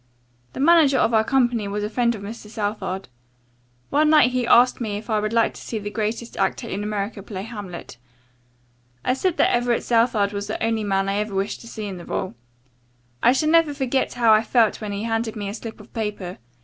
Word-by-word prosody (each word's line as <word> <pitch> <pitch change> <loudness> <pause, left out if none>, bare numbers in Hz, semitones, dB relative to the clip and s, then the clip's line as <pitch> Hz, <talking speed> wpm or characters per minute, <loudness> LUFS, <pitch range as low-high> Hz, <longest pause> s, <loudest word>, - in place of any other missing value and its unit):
The - - -7
manager 300 -2 +5
of 230 - +2
our 220 -1 +4
company 240 -4 +1
was 205 +1 -3
a - - 0
friend 235 0 +1
of 200 - -9
Mr. 215 +1 -8
Southard. 205 -3 -3 0.8
One 300 +2 +3
night 300 -5 +6
he 250 -1 -1
asked 245 +1 +5
me 210 -3 -2
if 215 +2 -7
I 215 - +2
would 215 0 -2
like 230 -1 +2
to - - -11
see 225 - -5
the 205 -1 -5
greatest 220 +2 -3
actor 235 - -1
in 200 -1 -3
America 210 0 -3
play 190 -1 -6
'Hamlet.' 205 - -8 1.1
I - - +3
said 340 +6 -1
that - - +3
Everett 240 -1 +1
Southard 225 -4 +2
was 200 0 -4
the - - -3
only 225 -1 0
man 195 -1 0
I 195 +1 0
ever 210 -1 -2
wished 195 +1 -2
to 230 - -12
see 220 -2 -6
in 195 -2 -5
the 170 - -10
role. 190 - -3 0.9
I 245 - +6
shall 305 +4 +1
never 325 -3 +4
forget 265 -1 -1
how 230 -2 +5
I 215 - +5
felt 225 -1 +2
when 210 -1 -4
he 200 +1 -3
handed 225 -1 -2
me 205 -2 -4
a - - -5
slip 225 0 -8
of 210 - -15
paper. 210 -5 -4
220 Hz, 220 wpm, -23 LUFS, 205-240 Hz, 1.1 s, night